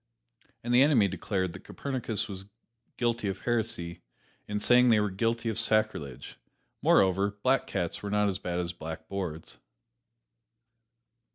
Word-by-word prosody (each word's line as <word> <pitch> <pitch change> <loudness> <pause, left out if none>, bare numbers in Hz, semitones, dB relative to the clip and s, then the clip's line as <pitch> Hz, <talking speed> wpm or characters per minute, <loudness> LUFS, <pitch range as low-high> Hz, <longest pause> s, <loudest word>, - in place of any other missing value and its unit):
And 120 +1 -1
the 125 - +6
enemy 135 -8 +5
declared 95 -1 -2
that 95 - -10
Copernicus 120 -5 -2
was 95 -1 -8 0.5
guilty 120 -3 0
of 95 - -3
heresy 110 -8 -2 0.5
in 105 - -2
saying 125 +4 +5
they 110 -2 +5
were 105 -1 0
guilty 115 +4 -1
of 110 0 0
sacrilege. 110 - 0 0.4
Moreover, 100 +2 +3
black 130 +1 +2
cats 90 -4 -2
were 100 - -4
not 105 0 +2
as 95 -1 -1
bad 90 -2 -3
as 85 -1 -2
blackboards. 80 0 -6
105 Hz, 135 wpm, -29 LUFS, 90-115 Hz, 0.5 s, the